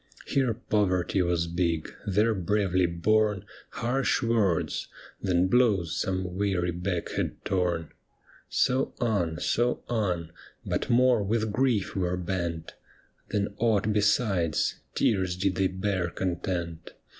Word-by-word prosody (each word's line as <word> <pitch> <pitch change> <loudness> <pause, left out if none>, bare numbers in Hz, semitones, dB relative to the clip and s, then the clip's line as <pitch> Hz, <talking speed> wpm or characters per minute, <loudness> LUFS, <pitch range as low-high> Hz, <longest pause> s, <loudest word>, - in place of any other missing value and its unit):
Here 130 -5 +1
poverty 95 -5 +1
was 85 -1 +1
big, 85 -2 -1
there 105 +3 +3
bravely 95 -2 +1
borne 105 +3 +1 0.2
Harsh 130 +2 0
words, 110 -8 +1 0.3
then 90 -1 +2
blows 100 -7 +2
some 95 -1 -2
weary 95 -3 0
back 90 0 -3
had - - -3
torn. 90 -5 0 0.6
So 130 +1 +1
on, 95 -9 0
so 120 +6 0
on, 90 -8 -1 0.3
but - - -2
more 125 -1 +4
with 110 +2 0
grief 120 -3 +1
were 90 -1 0
bent 85 -3 -3 0.6
Than 100 -1 -1
aught 110 -2 +2
besides, 100 -6 +1 0.2
tears 95 -4 +1
did 95 +1 0
they 95 +1 +2
bear 95 -1 -1
content. 85 -2 -3
95 Hz, 120 wpm, -27 LUFS, 90-110 Hz, 0.6 s, more